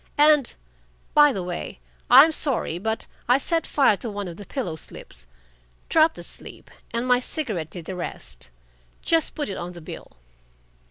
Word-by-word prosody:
And, 295 -3 +4 0.6
by 295 -1 +7
the 195 -7 -3
way, 180 +2 -6 0.3
I'm 270 +6 +9
sorry, 265 - 0
but 220 +3 -2 0.2
I 250 - +6
set 330 +4 -1
fire 270 -7 +3
to 235 - -5
one 205 -2 -5
of 170 -1 -8
the 205 - -10
pillow 230 - -4
slips - - -9 0.6
dropped 320 0 +4
asleep, - - -11 0.2
and 235 +1 -2
my 250 -1 +4
cigarette 220 - -2
did 170 -1 -9
the 190 - -5
rest. 60 - -8 0.5
Just 330 -1 +1
put 295 - -3
it 195 - -5
on 175 +1 -6
the 170 - -10
bill." - - -10
225 Hz, 165 wpm, -24 LUFS, 175-290 Hz, 0.6 s, I'm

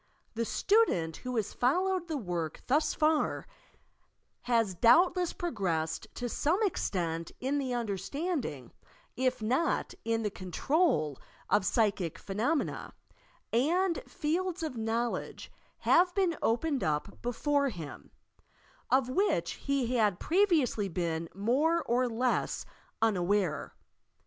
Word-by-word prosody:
The 230 0 -1
student 215 - +2
who 250 0 -5
ban 220 - +2
followed 355 - 0
the 315 -3 -2
work 175 - -4
thus 295 +5 +2
far 310 0 +1 1.0
has 230 -5 +2
doubtless 345 - +4
progressed 170 - -2
to 245 - -3
some 310 - +1
extent 170 - -1
in 275 +3 0
the 260 -3 -2
understanding, 230 - -3 0.4
if 255 -3 0
not 260 +10 0
in 225 0 0
the 210 - -1
control, 185 - 0 0.3
of - - +5
psyehie 200 - +1
phenomena, 235 +11 -2 0.6
and 335 +9 +2 0.3
iields 350 +3 0
of 310 -5 -3
knowledge 230 +1 -2 0.3
have 355 +1 +4
been 370 -4 +2
opened 270 +5 +1
up 155 +5 -2
before 280 +4 +1
him, 165 - -8 0.8
of 260 -1 +3
which 385 +11 +1
he 255 -3 -1
had 210 -5 +2
pre 390 +5 +3
viously 250 - +1
been 165 -1 -2
more 290 - +2
or 245 +1 +1
less 245 +2 0 0.4
unaware. 190 -5 +1
245 Hz, 115 wpm, -30 LUFS, 195-315 Hz, 1.0 s, of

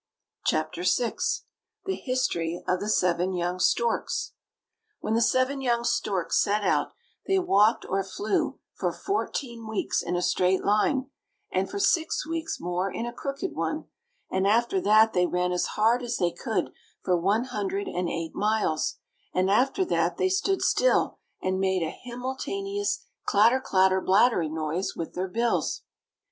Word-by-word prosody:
CHAPTER 155 +2 0
VI 225 +6 +1 0.7
THE 385 - 0
HISTORY 215 - -1
OF 180 - +1
THE 210 - -3
SEVEN 180 -2 +2
YOUNG 175 0 -2
STORKS 235 +5 0 0.7
When 215 - -2
the 230 - +2
seven 255 +3 +2
young 240 -2 +1
storks 195 -6 +1
set 210 +1 +1
out, - - +1 0.3
they 385 - +3
walked 220 - +3
or 195 +1 0
flew 200 +2 -1 0.2
for - - -1
fourteen 245 - -3
weeks 220 -2 -1
in 175 - -2
a 175 - 0
straight 185 +1 +2
line, 260 +6 +2 0.4
and 185 +1 0
for 400 - -5
six 345 -6 +1
weeks 325 0 -3
more 180 +2 -2
in 230 - -3
a 240 - -5
crooked 275 +8 -4
one; - - -3 0.4
and 190 +1 +1
after 235 - +2
that 220 -4 +5
they 180 0 +3
ran 180 0 0
as 180 - 0
hard 230 +3 +3
as 240 -1 -2
they 175 -1 +1
could - - -2 0.3
for 180 - +2
one 200 +7 +2
hundred 200 -5 -3
and 180 -1 -2
eight 165 -1 -4
miles; 210 -7 0 0.4
and 185 +1 +2
after 270 - +2
that 360 - 0
they 375 - +2
stood 385 0 +1
still, - - +2 0.2
and 185 0 0
made 190 -2 +1
a 160 - -2
himmeltanious 330 +12 -3 0.3
chatter 225 +6 +5
clatter 190 -4 +3
blattery 190 -4 +3
noise 160 +4 -2
with 165 - -5
their 185 +1 -2
bills. 230 +5 0
210 Hz, 155 wpm, -27 LUFS, 185-255 Hz, 0.7 s, that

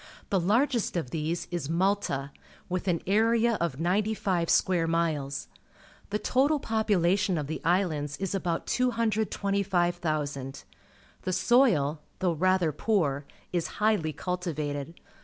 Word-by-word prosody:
The 195 - +3
largest 230 +3 +1
of 130 -7 -3
these 160 +2 -2
is 170 -5 -3
Malta, 170 -6 0 0.4
with 185 +1 -3
an 170 -3 0
area 225 +3 +3
of 155 -6 -1
ninety 200 +6 +1
five 180 -5 0
square 175 -3 +3
miles. 155 -4 -1 0.6
The 205 - 0
total 280 +7 +2
popula 210 -7 +2
tion 185 -3 0
of 150 - -2
the 155 +3 -5
islands 160 -4 0
is 195 -1 -3
about 175 -4 -1
225,000. 185 - 0 0.6
The 185 - -2
soil, 170 - +3 0.2
though 180 -2 +1
rather 185 0 +2
poor, 150 -5 0 0.3
is 175 -2 0
highly 210 -7 +2
cultivated. 160 -4 -4
180 Hz, 125 wpm, -28 LUFS, 155-205 Hz, 0.6 s, The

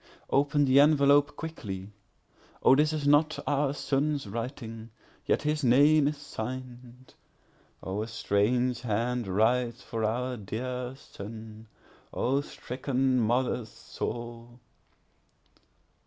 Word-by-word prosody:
Open 145 +1 +3
the 135 +1 +5
envelope 145 -1 +5
quickly;O 105 -4 -3
this 150 +2 +3
is 150 -2 -2
not 150 +2 +4
our 145 -1 +1
son's 145 0 -1
writing, 115 +1 -6 0.4
yet - - +1
his 150 0 0
name 145 +4 +5
is 150 0 -2
sign'd;O 125 -6 -9
a 110 - -4
strange 115 +3 +1
hand 120 0 -1
writes 120 +5 +1
for 115 -2 -4
our 125 +3 -1
dear 125 +4 -4
son—O 110 +4 -6
stricken 130 -1 -1
mother's 120 0 0
soul! 120 +1 -7
125 Hz, 95 wpm, -28 LUFS, 115-140 Hz, 0.4 s, the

